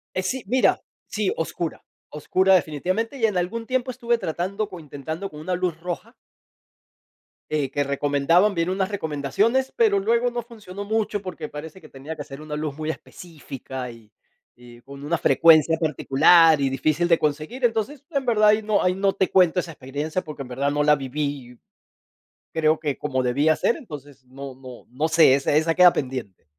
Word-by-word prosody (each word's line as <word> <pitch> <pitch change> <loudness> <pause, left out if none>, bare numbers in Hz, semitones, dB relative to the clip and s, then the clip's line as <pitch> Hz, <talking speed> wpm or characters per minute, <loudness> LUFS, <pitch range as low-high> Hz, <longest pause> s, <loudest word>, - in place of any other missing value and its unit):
Eh, 185 - 0
sí, 245 +7 -3
mira 255 +4 +2 0.3
sí, 210 -2 -1
oscura, 165 0 -4 0.3
oscura 185 +6 +2
definitivamente, 185 - -1
y, 225 - -1
en 210 - -3
algún 225 +6 -3
tiempo 255 0 -1
estuve 240 -1 -1
tratando, 195 +4 -3
o, 180 - -9
intentando 160 +5 -6
con 150 0 -11
una 180 +3 -2
luz 175 -3 -2
roja 180 +7 -6 1.4
eh, 145 -3 -1
que 145 +1 0
recomendaban, 145 +8 +2
vi 170 - -1
en 170 - -2
unas 190 +1 -1
recomendaciones, 200 - 0
pero 210 -4 +3
luego 235 +4 +1
no 240 0 -4
funcionó 205 -4 -9
mucho 210 -1 -1
porque 175 -5 -6
parece 160 +5 -9
que 155 - -15
tenía 140 +4 -8
que 150 - -7
ser 135 +2 -10
una 150 -1 -5
luz 150 -2 -4
muy 155 0 -3
específica, 135 -7 -8
y 115 -3 -15 0.5
y 120 -1 -14
con 140 +3 -12
una 170 +3 0
frecuencia 160 -1 +5
particular, 160 +1 +4
y 135 - +2
difícil 155 +5 0
de 170 -1 +4
conseguir. 155 - -3
Entonces, 240 +5 -1
en 275 -4 -2
verdad 215 -3 +4
ahí 210 +1 +4
no 210 -1 +1
ahí 180 - +2
no 195 0 +1
te 190 - 0
cuento 180 -1 +4
esa 170 - -7
experiencia 145 +6 -4
porque 150 -3 -8
en 125 - -11
verdad 140 +3 -1
no 145 0 +1
la 150 0 +4
viví 135 -2 -4 1.0
creo 155 -1 +2
que 150 -3 -2
como 135 -3 -1
debía 145 +6 +2
ser, - - +1
entonces 145 - -11
no 135 +1 -9
no 130 -2 -12
no 145 +6 -1
sé, 160 -4 +6
esa 140 +1 0
esa 160 +2 +2
queda 180 0 +7
pendiente. 125 - -5
160 Hz, 185 wpm, -23 LUFS, 145-200 Hz, 1.4 s, queda